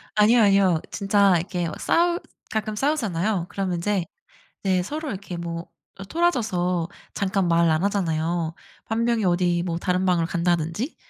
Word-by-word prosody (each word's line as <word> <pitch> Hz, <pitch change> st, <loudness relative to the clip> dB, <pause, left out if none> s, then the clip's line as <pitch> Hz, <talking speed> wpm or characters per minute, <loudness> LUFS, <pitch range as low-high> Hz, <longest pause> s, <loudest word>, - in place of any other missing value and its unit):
아니요, 220 Hz, +3 st, +5 dB
아니요. 195 Hz, -5 st, +4 dB
진짜 200 Hz, -1 st, +3 dB
이렇게 175 Hz, 0 st, -2 dB
막 155 Hz, -, -7 dB
싸우 345 Hz, +1 st, +2 dB, 0.3 s
가끔 215 Hz, -1 st, -2 dB
싸우잖아요. 210 Hz, -, 0 dB
그러면 190 Hz, -3 st, -2 dB
인제 185 Hz, 0 st, -1 dB, 0.6 s
네 185 Hz, -2 st, +2 dB
서로 300 Hz, -, -4 dB
이렇게 190 Hz, -3 st, -6 dB
뭐 170 Hz, 0 st, -5 dB, 0.3 s
아 195 Hz, -, -8 dB
토라져서 190 Hz, -, 0 dB, 0.3 s
잠깐 195 Hz, -2 st, 0 dB
말 170 Hz, 0 st, +4 dB
안 155 Hz, +3 st, +1 dB
하잖아요. 165 Hz, -4 st, -1 dB, 0.3 s
1 225 Hz, +1 st, -1 dB
명이 235 Hz, -3 st, +1 dB
어디 175 Hz, -1 st, +2 dB
뭐 170 Hz, -2 st, -2 dB
다른 180 Hz, +1 st, 0 dB
방을 175 Hz, -3 st, +2 dB
간다든지. 170 Hz, -, -1 dB
185 Hz, 320 characters per minute, -24 LUFS, 170-210 Hz, 0.6 s, 아니요